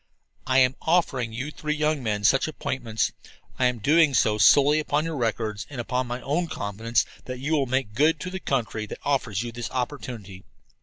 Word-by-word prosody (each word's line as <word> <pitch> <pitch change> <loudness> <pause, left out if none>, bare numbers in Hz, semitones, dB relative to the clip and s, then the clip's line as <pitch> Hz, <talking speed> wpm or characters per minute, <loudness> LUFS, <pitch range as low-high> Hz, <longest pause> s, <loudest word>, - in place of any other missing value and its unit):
"I 130 0 +3
am 130 0 +4
offering 140 -9 +1
you 130 +7 -4
three 150 0 -3
young 150 -1 0
men 105 -3 -2
such 135 +8 +4
appointments. 120 -7 -2 0.5
I 130 - +3
am 125 -1 +2
doing 150 +5 +4
so 105 -2 +3
solely 145 +7 +6
upon 150 0 0
your 165 -1 -3
records 110 -4 -2
and 140 -4 -7
upon 125 +1 -1
my 120 +1 -4
own 165 +6 0
confidence 110 -1 -1 0.2
that 125 0 -5
you 140 +5 -4
will 140 -4 +2
make 130 -4 -1
good 150 +6 +3
to 180 - -5
the 190 - -4
country 115 -8 -2
that - - -7
offers 120 -7 0
you 120 - -5
this 120 0 -5
opportunity. 120 -7 -5
130 Hz, 195 wpm, -25 LUFS, 115-150 Hz, 0.5 s, solely